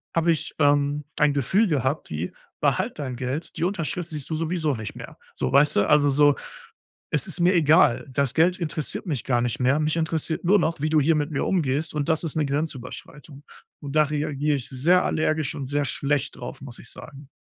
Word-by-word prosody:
habe 165 0 +3
ich, 160 - -2
ähm, 145 0 +2
ein 150 -1 +3
Gefühl 190 - +2
gehabt, 145 -2 -1
die 80 +3 -4 0.3
behalt - - 0
dein 130 -3 -4
Geld, 130 +6 -4
die - - -2
Unterschrift 180 -2 -3
siehst 150 -4 -6
du 160 - -1
sowieso 160 -1 -1
nicht 110 -2 -7
mehr. - - -10 0.2
So, - - -2
weißt 145 +2 +4
du? 100 - +2
Also, 145 -1 +5
so: 145 +1 +4 0.8
„Es - - +1
ist 175 - -4
mir 180 +2 +4
egal. 150 -6 +4
Das 135 -1 0
Geld 175 +3 +3
interessiert 155 -3 -4
mich 145 -7 -2
gar 120 -2 +1
nicht 120 0 -2
mehr. 130 +4 +3
Mich 155 +2 0
interessiert 160 0 -1
nur 200 +4 +5
noch, 165 -3 -1
wie 155 - 0
du 155 - +3
hier 160 +3 +3
mit 150 0 -1
mir 145 - -1
umgehst 155 -3 0
und 150 0 -2
das 160 0 +1
ist 160 - -4
'ne 150 -2 +1
Grenzüberschreitung“. 145 +1 -6 0.4
Und 145 +1 -6
da 155 - +6
reagiere 150 0 -1
ich 125 - -6
sehr 160 +8 +3
allergisch 155 -2 0
und 140 - -5
sehr 145 0 0
schlecht 140 0 -1
drauf, 120 - -8
muss 125 -3 -9
ich - - -10
sagen. 140 -1 -11
150 Hz, 210 wpm, -24 LUFS, 140-160 Hz, 0.8 s, da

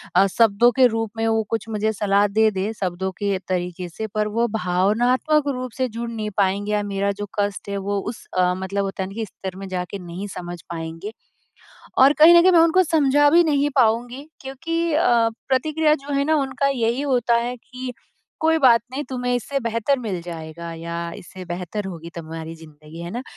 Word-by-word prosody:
अ, 190 +2 +6
शब्दों 230 +1 +5
के 255 +2 +4
रूप 225 -2 -2
में 225 - 0
हो 225 0 +2
कुछ 225 -1 -2
मुझे 220 0 0
सलाह 200 0 +2
दे-दे 210 -1 +1
शब्दों 190 +1 -2
के 200 -2 0
तरीके 180 -1 -3
से 220 +6 -5
पर 210 0 +1
वो 230 +3 0
भावनात्मक 225 - +1
रूप 255 0 -5
से 260 -1 +1
जुड़ 235 +1 -5
नहीं 220 -2 -4
पाएँगे 200 +1 +1
या 210 0 +1
मेरा 200 0 -1
जो - - -2
कष्ट 205 0 -2
है 200 - -2
वो 200 +1 -2
उस 225 - -9
अ, 180 0 +3
मतलब 195 +1 -2
होता 195 -1 -3
है - - -4
ना - - -10
कि 225 0 -3
स्तर 190 -1 -8
में 195 0 -7
जा 185 -1 -2
के 200 - -5
नहीं 180 +3 -7
समझ 175 -1 -7
पाएँगे। 165 +4 -6 0.8
और 270 +2 +7
कहीं 320 +3 +9
न - - +8
कहीं 370 - +5
मैं 345 - +6
उनको 335 +3 +5
समझा 290 -3 +3
भी 340 +3 +6
नहीं 290 -2 +2
पाऊँगी 245 +3 +1
क्योंकि 330 +5 -2
अ, 315 - +2 0.4
प्रतिक्रिया 305 +3 +2
जो 285 -1 -7
है 280 0 +2
ना 315 +1 +3
उनका 275 -1 0
यही 240 -1 0
होता 245 -4 +2
है 240 +1 -1
कि 255 +1 -8 0.5
कोई 320 0 +4
बात 240 -5 +6
नहीं 285 +3 -3
तुम्हें 250 -1 -1
इससे 275 +4 -2
बेहतर 230 +3 0
मिल 200 -7 -4
जाएगा 170 0 -7
या 170 +1 -6 0.2
इससे 185 +1 -10
बेहतर 180 +4 -4
होगी 170 -2 -8
तुम्हारी 165 0 -7
ज़िंदगी 155 0 -13
है 170 +1 -6
ना। 240 - -4
220 Hz, 205 wpm, -22 LUFS, 190-260 Hz, 0.8 s, कहीं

